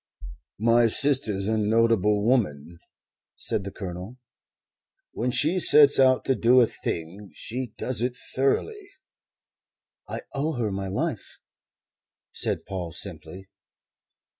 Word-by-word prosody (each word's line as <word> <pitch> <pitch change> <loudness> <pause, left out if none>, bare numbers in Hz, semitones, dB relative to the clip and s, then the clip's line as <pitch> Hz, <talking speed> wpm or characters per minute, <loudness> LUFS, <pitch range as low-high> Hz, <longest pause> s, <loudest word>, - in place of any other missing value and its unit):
"My 115 +2 +3
sister's 110 -6 +2
a 110 0 0
notable 105 -1 +2
woman," 85 - -1 0.6
said 100 - -2
the 100 - -5
Colonel. 95 +5 -8 0.9
"When 120 +3 -2
she 155 +8 +2
sets 145 -5 +5
out 130 -1 +4
to 135 - +2
do 120 +2 +4
a 120 - +6
thing 95 0 -6
she 125 -1 -5
does 125 -2 -2
it 125 0 -1 0.2
thoroughly." 395 - -1 1.2
"I - - -6
owe 150 +3 -2
her 115 -6 -2
my 95 0 -4
life," 95 - -4 1.0
said - - -1
Paul 90 -4 -6
simply. 90 +1 -2
115 Hz, 115 wpm, -25 LUFS, 95-130 Hz, 1.2 s, a